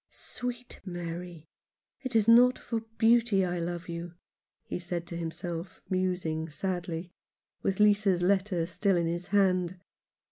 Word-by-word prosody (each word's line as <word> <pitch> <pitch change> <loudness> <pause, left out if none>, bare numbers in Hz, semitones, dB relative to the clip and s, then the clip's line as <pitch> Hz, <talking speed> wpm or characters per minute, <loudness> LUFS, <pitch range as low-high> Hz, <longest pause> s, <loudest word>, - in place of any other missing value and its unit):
" - - -61
Sweet 245 0 -6
Mary, 175 -2 -6 0.6
it 260 -3 -4
is 220 -1 +4
not 245 +2 +7
for 230 - -3 0.2
beauty 225 -4 +4
I 175 -1 -2
love 170 +1 -4
you," 170 0 -6 0.5
he - - -4
said 175 -1 -4
to 170 - -7
himself, 170 +1 -5
musing 180 -4 -1
sadly, 175 +1 -3 0.5
with 195 0 -1
Lisa's 205 -4 +4
letter 190 -2 +2
still 185 +2 +1
in 170 - +1
his 170 +2 -2
hand. 185 -3 +2
180 Hz, 140 wpm, -29 LUFS, 170-200 Hz, 0.6 s, not